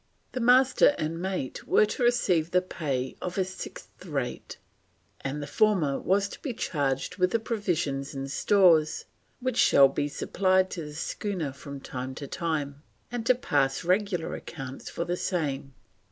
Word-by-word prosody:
The 255 - -3
Master 255 +4 +5
and 165 +2 -3
mate 185 -8 -4
were - - +5
to 215 - -5
receive 185 -9 +2
the 180 +1 +3
pay 135 -8 -3
of 180 +1 -4
a 190 - +2
sixth 185 -1 -9
rate, 140 -8 -4 0.7
and 145 +2 -3
the - - -4
former 160 -4 +2
was 200 +1 +2
"to - - -10
be 255 -6 -4
charged 140 -5 -1
with 180 -1 +3
the 230 - +2
provisions 170 - -2
and 135 0 -4
stores 170 -5 +4 0.4
which 255 -1 -1
shall 135 -1 +7
be 145 +1 -1
supplied 185 +5 +1
to 165 -3 -5
the 150 0 -9
schooner 165 -3 -3
from 140 0 -9
time 130 0 -5
to 140 - -6
time, 145 -2 -3 0.3
and 235 -2 -3
to 255 - +6
pass 145 - 0
regular 185 -1 0
accounts 135 -4 -7
for 170 - -3
the 175 - -1
same." 140 -7 -2
165 Hz, 165 wpm, -27 LUFS, 140-195 Hz, 0.7 s, shall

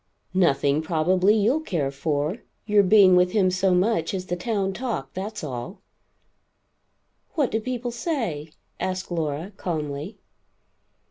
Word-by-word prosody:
"Nothing, 150 -5 +2
probably, 180 +5 +2
you'll 225 +8 +2
care 165 - -2
for. 150 +5 -1 0.3
Your 210 -1 +5
being 195 -1 +6
with 180 0 +3
him 190 -4 +3
so 185 +1 +1
much 180 -2 +1
is 185 -1 -4
the 175 - -2
town 195 0 -1
talk, 220 - -4
that's 205 +2 -5
all?" 135 - -6 1.5
"What 290 -6 +1
do 220 - +1
people 245 +1 -3
say?" 230 - -3 0.3
asked 185 0 -3
Laura 160 +2 -2
calmly. 155 +1 -4
185 Hz, 130 wpm, -24 LUFS, 155-215 Hz, 1.5 s, being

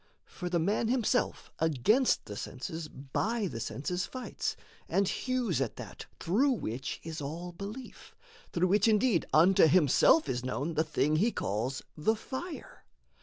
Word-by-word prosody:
For 180 -1 -6
the 175 - +1
man 205 +7 +1
himself 245 0 0
Against 160 - +2
the 105 - -7
senses 155 +9 -5
by 200 - -2
the 140 -11 -4
senses 180 +10 -3
fights, 255 -1 -4 0.3
And 195 0 +2
hews 245 - -1
at 125 - -2
that - - -9
through 255 +11 +2
which 130 - -4
is 160 -2 -6
all 165 +5 -5
belief, 205 +8 -9 0.4
Through 180 +1 +1
which 205 +3 +4
indeed 220 -4 +3
unto 170 +2 +6
himself 175 - +5
is 125 0 -2
known 140 +5 -2
The 155 0 +2
thing 155 -1 +1
he 220 +8 +3
calls 120 - -2
the 165 +9 +1
fire. 280 +9 -7
175 Hz, 150 wpm, -30 LUFS, 150-225 Hz, 0.4 s, unto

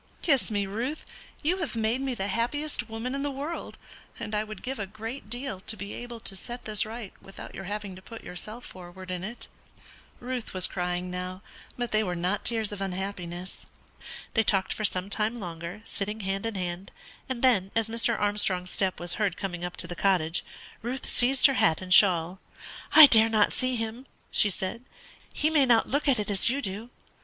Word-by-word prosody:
Kiss 280 -8 +3
me, 205 -2 0
Ruth; 235 +10 -3 0.4
you 345 +5 +2
have 330 -9 -3
made 225 +3 +1
me 265 -2 -1
the 195 -3 -1
happiest 240 +3 -1
woman 225 +3 -3
in 275 - -1
the 285 - 0
world, 285 +5 -5 0.4
and 210 - -5
I 210 0 +1
would 215 0 -9
give 265 -1 -3
a 200 - -3
great 220 +4 -7
deal 245 -4 -3
to 215 +3 -4
be 200 +1 -6
able 240 -1 -7
to 195 - -3
set 240 +6 -7
this 215 -1 +2
right 225 -3 -7
without 195 - -10
your 195 - -7
having 205 -1 -4
to 185 - -11
put 230 +3 -10
yourself 215 +7 -5
forward 185 0 -10
in 180 0 -3
it." 235 +5 -6 0.7
Ruth 245 -4 -4
was 185 -1 +2
crying 180 0 -2
now, 180 +2 -4 0.3
but 245 -1 -1
they 215 0 +3
were 180 -3 -2
not 180 +4 0
tears 225 -3 +2
of 205 -1 -5
unhappiness. 185 -2 -5 0.7
They 225 - +4
talked 195 -3 +3
for 215 - -5
some 185 -1 0
time 215 +3 -1
longer, 175 +1 -6
sitting 210 +2 -4
hand 195 +2 -2
in 225 - -4
hand; 180 0 -4 0.4
and 260 -2 -3
then, 210 -8 +4
as 225 -1 +2
Mr. 230 0 0
Armstrong's 200 -3 +1
step 190 -4 0
was 175 0 0
heard 195 -4 +1
coming 175 -3 -4
up 175 0 -4
to - - +3
the 175 - -5
cottage, 175 -4 +2 0.4
Ruth 245 +3 -4
seized 260 +2 +4
her 275 - +8
hat 160 -10 +3
and 185 -1 +1
shawl. 180 -2 +6 0.5
"I 315 - +13
dare 225 -4 +6
not 215 -2 +3
see 255 0 0
him," 230 +3 -4 0.2
she 210 - +5
said; 190 +4 -4 0.5
"he 310 - +1
may 290 -4 +4
not 230 -2 +5
look 285 +3 0
at 270 -3 +5
it 210 -1 -2
as 200 +3 +3
you 265 +3 0
do." 210 -1 -5
210 Hz, 205 wpm, -28 LUFS, 185-240 Hz, 0.7 s, I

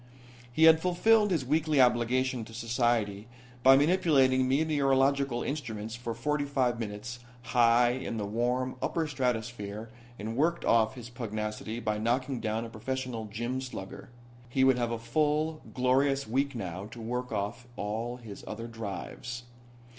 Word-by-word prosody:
He 155 +6 +2
had 160 0 +8
fulfilled 210 +5 +4
his 160 -8 0
weekly 155 +1 +2
obligation 125 0 +2
to 115 - -12
society 115 -3 0 0.3
by 135 +2 +8
manipulating 140 -5 +3
meteorological 140 -3 +2
instruments 115 -7 -4
for 120 -1 -5
forty 150 +5 0
five 130 -4 0
minutes, 115 +3 -5 0.2
high 120 -1 +4
in 125 -2 -4
the 105 - -2
warm, 125 +4 -1
upper 165 -1 0
stratosphere 115 -5 -3 0.3
and 110 +2 -5
worked 165 +6 +1
off 110 0 +3
his 120 -1 -9
pugnacity 110 -1 -4
by 110 -2 -1
knocking 125 +3 0
down 110 +1 -2
a - - -7
professional 125 0 -4
gym 120 +5 -3
slugger. 110 -7 -8 0.4
He 130 +2 +2
would 130 -1 +4
have 120 -1 0
a 115 - -2
full, 150 +6 0
glorious 135 +2 +2
week 135 +4 0
now 95 -2 -5
to 120 +2 -11
work 125 +2 -3
off 110 +4 -3
all 115 +4 -3
his 110 -5 -10
other 115 +2 -5
drives. 115 +2 -6
120 Hz, 145 wpm, -29 LUFS, 115-135 Hz, 0.4 s, had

